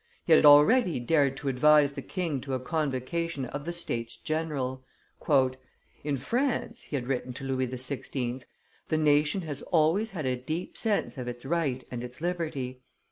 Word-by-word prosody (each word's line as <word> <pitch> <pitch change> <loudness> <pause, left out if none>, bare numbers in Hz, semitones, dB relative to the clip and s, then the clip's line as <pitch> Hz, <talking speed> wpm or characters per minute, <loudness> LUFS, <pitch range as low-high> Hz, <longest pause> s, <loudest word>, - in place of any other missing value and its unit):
He 165 - +5
had 155 - +7
already 155 - +6
dared 140 +1 +2
to 145 - -6
advise 145 +2 +5
the - - -5
king 165 -8 -3
to 135 0 -3
a - - -2
convocation 150 +1 -2
of 145 +4 -6
the 170 - -2
states 115 -9 -4
general. 145 -5 -3 1.2
"In 145 -2 -1
France," 235 - -1
he - - -6
had 130 -3 -2
written 125 -1 -2
to 135 - -8
Louis 130 -1 -1
XVI., 130 0 -2 0.4
"the 155 - +1
nation 150 +3 +3
has 150 -4 -4
always 170 +7 +2
had 170 -8 -5
a 130 -1 +1
deep 155 +8 -5
sense 210 - -1
of 125 - -5
its 120 +1 -6
right 140 -5 -1
and 120 -1 -4
its 125 +1 -8
liberty. 155 -7 -3
145 Hz, 170 wpm, -28 LUFS, 130-165 Hz, 1.2 s, had